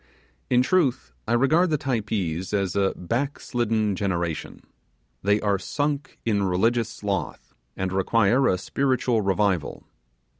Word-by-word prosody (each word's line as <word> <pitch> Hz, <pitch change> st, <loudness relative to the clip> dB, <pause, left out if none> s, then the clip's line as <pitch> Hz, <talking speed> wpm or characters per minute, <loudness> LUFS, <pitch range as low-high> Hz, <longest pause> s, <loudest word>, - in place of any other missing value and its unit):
In 125 Hz, 0 st, +4 dB
truth, 130 Hz, -, +1 dB, 0.2 s
I 115 Hz, -, +1 dB
regard 155 Hz, +9 st, +3 dB
the 155 Hz, -, +1 dB
Typees 105 Hz, -, -2 dB
as 95 Hz, -2 st, -1 dB
a 100 Hz, -1 st, +2 dB
back 125 Hz, +11 st, -2 dB
slidden 110 Hz, -4 st, 0 dB
generation. 85 Hz, -4 st, -3 dB, 0.6 s
They 105 Hz, +1 st, +2 dB
are 100 Hz, -2 st, +1 dB
sunk 145 Hz, +7 st, -2 dB
in 105 Hz, -3 st, +1 dB
religious 110 Hz, +5 st, +1 dB
sloth, 100 Hz, -2 st, -4 dB, 0.2 s
and 95 Hz, 0 st, -2 dB
require 115 Hz, +6 st, +3 dB
a 90 Hz, -, +2 dB
spiritual 125 Hz, +4 st, 0 dB
revival. 95 Hz, -4 st, 0 dB
105 Hz, 125 wpm, -25 LUFS, 95-125 Hz, 0.6 s, In